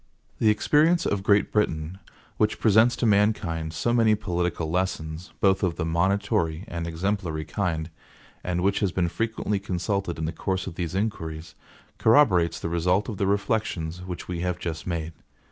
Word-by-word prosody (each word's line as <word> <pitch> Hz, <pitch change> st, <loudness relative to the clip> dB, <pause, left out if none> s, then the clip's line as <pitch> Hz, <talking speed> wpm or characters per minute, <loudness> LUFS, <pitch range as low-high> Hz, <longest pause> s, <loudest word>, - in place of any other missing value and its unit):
The 110 Hz, -, +4 dB
experience 155 Hz, +10 st, +3 dB
of 100 Hz, -, 0 dB
Great 100 Hz, +1 st, +3 dB
Britain, 85 Hz, -4 st, -1 dB, 0.4 s
which 105 Hz, 0 st, +1 dB
presents 110 Hz, +2 st, +5 dB
to -, -, -1 dB
mankind 100 Hz, -7 st, +1 dB
so 120 Hz, +9 st, -1 dB
many 115 Hz, -2 st, +4 dB
political 90 Hz, -5 st, -2 dB
lessons, 90 Hz, -2 st, -2 dB
both 95 Hz, -1 st, +3 dB
of 90 Hz, -4 st, 0 dB
the -, -, -2 dB
monitory 85 Hz, -1 st, 0 dB
and 85 Hz, -3 st, -4 dB
exemplary 85 Hz, -2 st, -2 dB
kind, 85 Hz, -6 st, -2 dB, 0.6 s
and 90 Hz, -1 st, -1 dB
which 100 Hz, +1 st, +2 dB
has 100 Hz, -3 st, +1 dB
been 85 Hz, -2 st, 0 dB
frequently 105 Hz, +1 st, -2 dB
consulted 95 Hz, -1 st, -2 dB
in 80 Hz, -, -2 dB
the 80 Hz, -, -2 dB
course 95 Hz, +1 st, -2 dB
of -, -, -6 dB
these 85 Hz, 0 st, -4 dB
inquiries, 80 Hz, -6 st, -3 dB, 0.5 s
corroborates 105 Hz, -, +4 dB
the -, -, -3 dB
result 90 Hz, +6 st, +1 dB
of 105 Hz, -, -5 dB
the 100 Hz, -, 0 dB
reflections 95 Hz, -5 st, -1 dB
which 90 Hz, -1 st, -7 dB
we 90 Hz, -2 st, -4 dB
have 90 Hz, 0 st, -1 dB
just 85 Hz, -1 st, -5 dB
made. 85 Hz, -2 st, -3 dB
90 Hz, 165 wpm, -25 LUFS, 85-105 Hz, 0.6 s, presents